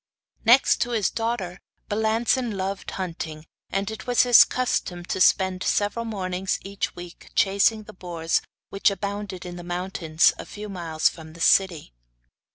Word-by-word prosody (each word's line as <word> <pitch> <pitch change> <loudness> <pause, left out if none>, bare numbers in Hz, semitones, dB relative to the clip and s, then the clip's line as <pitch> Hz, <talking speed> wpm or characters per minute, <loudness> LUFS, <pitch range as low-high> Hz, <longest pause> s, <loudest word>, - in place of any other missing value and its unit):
Next 245 +4 +5
to 245 - 0
his 215 -5 +1
daughter, 225 -6 -3 0.3
Balancin 220 +2 0
loved 195 +1 -3
hunting, 165 -4 -5 0.2
and 195 +2 -2
it 220 - -8
was 245 -1 +4
his 245 -2 +8
custom 180 -8 -2
to 185 - -3
spend 190 0 +3
several 205 +4 0
mornings 190 -3 -2
every 200 0 -10 0.2
week 175 -1 -11
chasing 200 +3 +3
the - - -12
boars 170 -3 -1 0.3
which 195 - +3
abounded 200 -2 -5
in 175 0 -7
the 175 - -8
mountains 175 -2 +1
a - - -6
few 210 0 -8
miles 165 -4 0
from 160 -2 -6
the 170 - -14
city. 170 - +2
195 Hz, 155 wpm, -24 LUFS, 175-215 Hz, 0.3 s, his